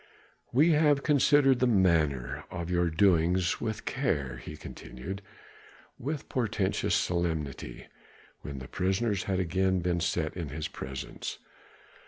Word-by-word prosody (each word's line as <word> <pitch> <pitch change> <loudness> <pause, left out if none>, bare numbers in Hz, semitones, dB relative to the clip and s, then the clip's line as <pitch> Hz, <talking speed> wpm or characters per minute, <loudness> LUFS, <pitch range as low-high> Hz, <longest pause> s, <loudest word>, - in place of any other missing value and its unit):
"We 150 +7 +5
have 150 -2 +4
considered 140 -3 +4
the 125 - +3
matter 80 - +2
of 85 0 -5
your 90 -1 +2
doings 90 +1 +3
with 110 -2 -3
care," 70 - -1
he - - -9
continued 90 +11 -8 0.8
with 145 +2 -4
portentous 110 -6 0
solemnity, 80 -8 -2 0.6
when 70 -2 -6
the 65 -1 -7
prisoners 95 +2 0
had 95 -1 0
again 95 +1 +1
been 85 0 0
set 85 -1 -1
in 85 -5 -4
his 80 +2 -4
presence. 65 -2 -6
90 Hz, 125 wpm, -29 LUFS, 80-115 Hz, 0.8 s, We